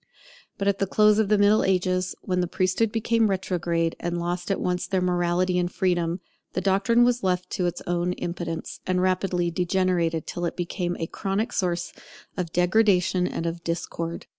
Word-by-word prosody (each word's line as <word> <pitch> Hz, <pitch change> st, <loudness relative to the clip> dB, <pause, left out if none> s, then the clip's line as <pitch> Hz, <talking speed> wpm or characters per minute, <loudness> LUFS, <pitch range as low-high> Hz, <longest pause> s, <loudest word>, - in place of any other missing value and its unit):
But 200 Hz, -, -2 dB
at 200 Hz, -1 st, +2 dB
the 195 Hz, -, +1 dB
close 210 Hz, +2 st, +4 dB
of 215 Hz, -2 st, +2 dB
the 210 Hz, -, +4 dB
Middle 205 Hz, +1 st, +4 dB
Ages, 185 Hz, -1 st, +1 dB
when 180 Hz, -1 st, 0 dB
the 180 Hz, -, 0 dB
priesthood 185 Hz, +5 st, +1 dB
became 225 Hz, 0 st, +2 dB
retrograde, 170 Hz, -3 st, -1 dB
and 175 Hz, 0 st, -2 dB
lost 175 Hz, +1 st, -3 dB
at 195 Hz, -, 0 dB
once 180 Hz, 0 st, -1 dB
their 190 Hz, -, +1 dB
morality 180 Hz, 0 st, +1 dB
and 175 Hz, 0 st, 0 dB
their -, -, -24 dB
freedom, 175 Hz, -1 st, 0 dB, 0.3 s
the -, -, 0 dB
doctrine 200 Hz, +6 st, +3 dB
was 245 Hz, 0 st, +2 dB
left 180 Hz, -1 st, -1 dB
to 180 Hz, -3 st, 0 dB
its 175 Hz, -, -4 dB
own 175 Hz, +1 st, 0 dB
impotence, 170 Hz, -2 st, -5 dB
and 185 Hz, 0 st, +1 dB
rapidly 180 Hz, -1 st, +1 dB
degenerated 175 Hz, -2 st, 0 dB
till 175 Hz, -, -3 dB
it 170 Hz, -, -3 dB
became 175 Hz, 0 st, -2 dB
a 165 Hz, -, -1 dB
chronic 195 Hz, +5 st, -2 dB
source 175 Hz, -2 st, -1 dB, 0.4 s
of 175 Hz, -3 st, -3 dB
degradation 180 Hz, -1 st, +3 dB
and 165 Hz, -, -4 dB
of 170 Hz, 0 st, -3 dB
discord. 170 Hz, 0 st, -4 dB
180 Hz, 185 wpm, -25 LUFS, 175-195 Hz, 0.4 s, close